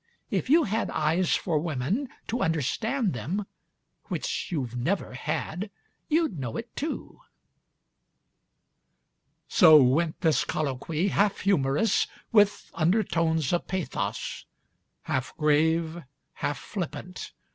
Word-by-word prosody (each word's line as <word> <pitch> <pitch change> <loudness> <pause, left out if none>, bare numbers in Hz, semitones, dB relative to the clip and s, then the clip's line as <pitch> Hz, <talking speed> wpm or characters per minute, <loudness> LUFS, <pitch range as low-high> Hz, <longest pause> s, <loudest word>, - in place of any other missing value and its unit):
If - - -1
you 325 +3 +6
had 220 0 -1
eyes 160 +4 +1
for 160 -4 0
women, 165 - -1 0.2
To 240 +2 -1
understand 195 - 0
them, 160 - -3 0.6
which - - -3
you've 130 -8 -2
never 150 +6 -1
had, 175 +9 -3 0.4
You'd 310 - +1
know 120 -4 -4
it 230 0 -7
too... 305 +3 -4 1.0
.' - - -50
So 160 -6 +8
went 150 +5 +3
this 160 -3 +3
colloquy, 155 +5 -1
Half 200 0 +1
humorous, 185 +2 +2 0.2
with 205 -2 +3
undertones 165 - +1
of 175 - 0
pathos, 185 -3 -3 0.6
Half 130 0 -2
grave, 160 +2 +2 0.3
half 145 - -2
flippant 180 +2 -6
165 Hz, 110 wpm, -27 LUFS, 150-200 Hz, 1.0 s, So